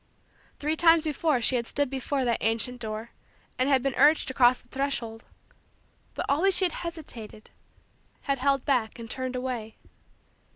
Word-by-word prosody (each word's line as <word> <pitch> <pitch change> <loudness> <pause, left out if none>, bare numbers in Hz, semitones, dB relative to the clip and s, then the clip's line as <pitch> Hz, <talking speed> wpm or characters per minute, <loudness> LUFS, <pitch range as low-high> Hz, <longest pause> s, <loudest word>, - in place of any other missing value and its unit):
Three 300 +2 -1
times 330 -1 +5
before 305 -3 0
she 250 +2 +3
had 235 -1 -3
stood 285 0 0
before 270 +1 -2
that 235 -1 +1
ancient 230 +3 -1
door 220 +1 -5 0.5
and 255 +2 +2
had 265 -3 +3
been 275 -1 0
urged 305 +2 +4
to - - -5
cross 250 -1 +4
the - - -23
threshold; 245 -4 -3 0.9
but - - -3
always 350 +7 +3
she 380 - +5
had 355 - +1
hesitated, 275 -11 -8 0.7
had 275 -1 -1
held 275 0 +1
back, 250 -6 0
and 230 -1 -8
turned 260 -1 -4
away. 250 -4 -4
260 Hz, 165 wpm, -27 LUFS, 235-285 Hz, 0.9 s, times